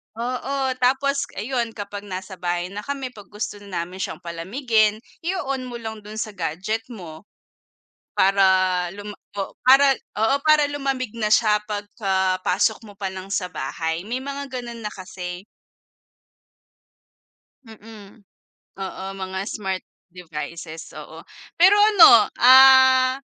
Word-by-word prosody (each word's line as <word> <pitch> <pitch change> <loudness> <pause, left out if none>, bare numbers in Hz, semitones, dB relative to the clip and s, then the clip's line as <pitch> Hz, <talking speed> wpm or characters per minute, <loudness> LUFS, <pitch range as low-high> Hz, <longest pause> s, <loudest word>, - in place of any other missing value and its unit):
Oo, 260 +3 -2
tapos 275 +2 +1
ayun 235 +1 -3
kapag 205 -1 -7
nasa 190 0 -7
bahay 175 +1 -2
na 205 - -6
kami 275 -3 -4
pag 205 -6 -14
gusto 210 0 -6
namin 185 -2 -6
siyang - - -5
palamigin 215 +5 0 0.2
i-o-on 275 -8 -3
mo 245 - -7
lang 220 -2 -6
dun 210 +1 -11
sa 220 0 -4
gadget 190 +5 -3
mo. 180 -6 -11 0.9
Para 195 0 +3 0.5
luma 205 +1 -9 0.2
oh, - - -5
para 270 +1 +6 0.2
oo 225 +5 +3
para 305 -2 +4
lumamig 270 -5 -3
na 215 -2 -1
siya 215 -2 +4
pagka 195 -3 -1
pasok 205 +5 +1
mo 205 - -12
pa 195 -2 -3
lang 190 +1 -9
sa 180 -2 -1
bahay 160 +3 -4
may 245 +4 -4
mga 280 0 -6
ganun 235 -1 -9
na 210 - -4
kasi. 180 0 -8 2.2
Mm. 220 -1 -14 0.6
Oo, 190 0 -6
mga 190 0 -5
smart 190 -3 -4 0.3
devices, 165 -1 -8
oo. - - -10 0.3
Pero 375 +4 +6
ano, 400 - +7
ah, 260 0 +7
215 Hz, 130 wpm, -22 LUFS, 190-255 Hz, 2.2 s, ano